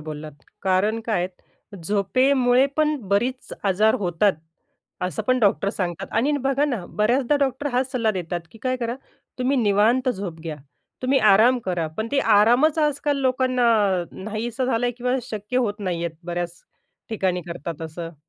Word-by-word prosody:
बोललात 150 -1 -8 0.2
कारण 195 +4 +1
काय 215 -5 +1
आहे. 190 +2 -13
झोपेमुळे 250 +7 +3
पण 305 -1 +2
बरीच 245 +6 -1
आजार 205 +3 +3
होतात, 190 +1 +2 0.7
असं 180 -4 -2
पण 255 0 +3
डॉक्टर 200 -3 +2
सांगतात. 175 -5 -3
आणि 260 +7 +2
बघा 275 +1 +2
ना, 245 -11 -2
बऱ्याचदा 245 +6 +1
डॉक्टर 270 +1 0
हाच 255 +1 0
सल्ला 230 -4 +1
देतात, 175 -3 -3
की 225 - -14
"काय 255 0 0
करा 235 -1 -3 0.4
तुम्ही 260 +2 +1
निवांत 230 +4 +3
झोप 190 -8 -4
घ्या, 160 -2 -5 0.5
तुम्ही 265 +1 +3
आराम 235 +6 +5
करा." 175 -3 -1
पण 220 +1 -2
ते 280 - +2 0.2
आरामच 245 +9 +4
आज-काल 295 -1 +1
लोकांना 255 -1 +1 0.6
नाहीसं 220 +4 -3
झालंय 245 -1 +1
किंवा 250 +1 0
शक्य 215 +3 -4
होत 210 -4 -1
नाहीये, 170 -3 -2 0.2
बऱ्याच 175 -1 -4 0.5
ठिकाणी 190 -5 -1
करतात 165 -1 -6
असं. 165 +1 -7
220 Hz, 150 wpm, -23 LUFS, 185-255 Hz, 0.7 s, आराम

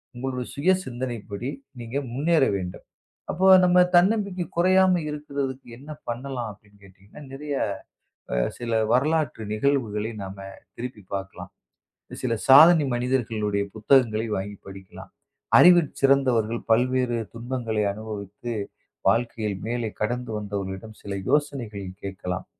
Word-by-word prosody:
உங்களோட 125 +1 -3
சுயசிந்தனைப்படி, 125 - -2 0.3
நீங்க 120 +3 -5 0.2
முன்னேற 150 +2 +2
வேண்டும். 90 -1 -7 0.5
"அப்போ 185 +4 +1 0.2
நம்ம 180 0 +6
தன்னம்பிக்கை 195 0 +2
குறையாம 185 0 +4
இருக்குறதுக்கு 140 -3 -4
என்ன 145 +4 -12 0.2
பண்ணலாம்?" 120 0 -4
அப்படின்னு 105 0 -23
கேட்டீங்கன்னா, 95 +7 -15
நிறையா 145 0 -3 0.7
அ, - - 0 0.2
சில 120 -1 -5 0.2
வரலாற்று 150 -3 +1
நிகழ்வுகளை 110 -3 0
நாம 95 +1 -8 0.4
திருப்பிப் 115 -5 -8
பாக்கலாம். 95 0 -6 0.7
சில 120 -2 +1 0.2
சாதனை 155 +3 +9
மனிதர்களுடைய 115 -5 -1
புத்தகங்களை 110 -1 +3
வாங்கிப் 100 +1 -6
படிக்கலாம். 95 -1 -11 0.5
அறிவிற் 175 -3 +7
சிறந்தவர்கள், 130 -5 +3
பல்வேறு 125 +1 +2 0.2
துன்பங்களை 115 -2 -2
அனுபவித்து, 105 +1 -7 0.6
வாழ்க்கையில் 115 -4 0
மேலே 120 -1 -2
கடந்து 120 +3 -2
வந்தவர்களிடம் 100 +1 -6
சில 100 - -5 0.2
யோசனைகள் 130 -8 -1 0.2
கேக்கலாம். 95 -1 -5
120 Hz, 105 wpm, -25 LUFS, 105-140 Hz, 0.7 s, சாதனை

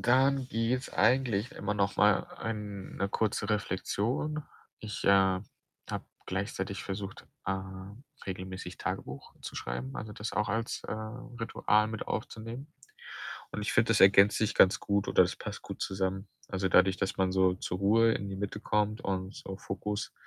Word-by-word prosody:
dann 130 +2 +4
gibt's 120 +3 0
eigentlich 120 -2 +3
immer 105 +1 -2
noch 100 -1 +1
mal 105 0 +5
eine 105 -3 -4
kurze 105 -1 0
Reflexion. 105 +9 -1 0.4
Ich, 105 -1 -6
äh, 95 -1 +5 0.5
habe - - -3 0.2
gleichzeitig 95 0 -3
versucht, 100 0 -5 0.2
äh, 95 0 +1 0.7
regelmäßig 95 -1 -5
Tagebuch 65 +1 -5
zu - - -7
schreiben, 60 +2 -4
also, 110 -1 -5
das 105 +1 -5
auch 105 +1 +1
als, 115 +3 -1
äh, - - -4
Ritual 110 -1 0
mit 110 -1 -5
aufzunehmen. 115 +7 -5 0.8
Und 105 - -4
ich 105 - -1
finde, 110 - +4
das 115 - +4
ergänzt 100 +1 +7
sich 110 - +1
ganz 95 - +6
gut 100 -1 0
oder - - +6
das - - -1
passt - - -6
gut - - -8
zusammen. 95 +1 -1 0.2
Also, 95 0 0
dadurch, 95 +1 +5
dass 95 - -1
man 95 -1 +2
so 95 -1 +4
zur 90 0 -4
Ruhe 110 +4 +5
in 100 - -3
die 95 - -4
Mitte 100 +1 -3
kommt 105 0 0
und 95 0 -2
so 95 - -7
Fokus 105 +2 -4
100 Hz, 160 wpm, -31 LUFS, 95-110 Hz, 0.8 s, ergänzt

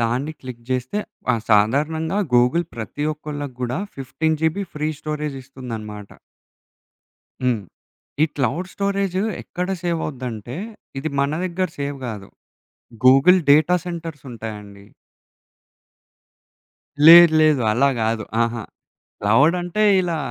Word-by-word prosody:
దాన్ని 125 +6 -1
క్లిక్ 125 -2 -9
చేస్తే 130 +9 -1 0.3
ఆహ్, 115 - -2
సాధారణంగా 150 - +2 0.2
గూగుల్ 125 +8 +3
ప్రతి 120 +6 -5
ఒక్కోళ్ళకు 145 -3 -7
గూడా 125 +4 -2 0.2
15 155 +4 -1
జీబీ 160 +5 0
ఫ్రీ 150 +1 -1
స్టోరేజ్ 150 -2 -4
ఇస్తుందనమాట. 110 -6 -8 1.3
హ్మ్. 125 -4 +1 0.6
ఈ - - +7
క్లౌడ్ 145 +7 -1
స్టోరేజ్ 200 -2 -1 0.3
ఎక్కడ 180 +1 -4
సేవ్ 170 -2 -1
అవుద్దంటే, 125 -3 -6 0.4
ఇది 150 +4 -2
మన 140 0 +1
దగ్గర 185 +1 -1
సేవ్ 140 0 -3
గాదు. 105 -5 -7 0.8
Google 135 +8 +7
data 155 +5 +5
centres 165 -5 -6
ఉంటాయాండి. 105 -3 -9 2.2
లేదు. 170 0 +10
లేదు. 155 -3 +4
అలా 130 +5 +3
గాదు. 110 0 0 0.2
అహా! 115 0 -2 0.6
క్లౌడ్ 130 - +4
అంటే 175 +5 -1 0.2
ఇలా 175 -2 -1
140 Hz, 110 wpm, -21 LUFS, 120-160 Hz, 2.2 s, లేదు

